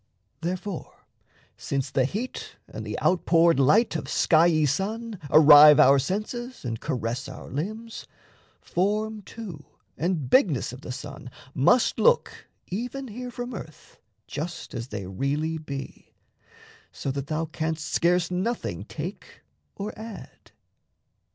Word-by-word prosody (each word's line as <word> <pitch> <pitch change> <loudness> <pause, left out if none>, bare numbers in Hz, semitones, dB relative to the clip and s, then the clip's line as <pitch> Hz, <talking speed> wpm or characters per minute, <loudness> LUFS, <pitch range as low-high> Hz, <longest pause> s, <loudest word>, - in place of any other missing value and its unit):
Therefore, 180 +1 -5 0.5
since 135 -1 -3
the 130 -2 +2
heat 215 - -5
And - - -7
the - - -4
outpoured 170 -3 +4
light 165 - +4
of 160 - -3
skiey 155 +1 +3
sun 210 - -2
Arrive 150 0 +9
our 140 -1 +7
senses 215 - -4
and 115 -2 -3
caress 125 0 -3
our 130 - -10
limbs, 215 - -5 0.5
Form 210 +4 -1
too 190 -7 -9 0.4
and 165 -5 -1
bigness 150 - +3
of 130 - -10
the 140 - -7
sun 140 0 -8 0.2
must 235 - +3
look 485 0 +2 0.2
Even 245 +7 -5
here 250 +4 -6
from 245 +1 -6
earth - - -11 0.3
just 160 +2 -6
as 115 - -5
they 105 -5 -6
really 145 - -2
be, 140 -3 -8 0.8
So 135 - -4
that 140 +1 -4
thou 155 +2 -1
canst 160 0 -3
scarce 175 0 +2
nothing 190 +7 -2
take - - -8 0.3
or 205 +2 -5
add. 220 -1 -10
165 Hz, 125 wpm, -26 LUFS, 140-215 Hz, 0.8 s, Arrive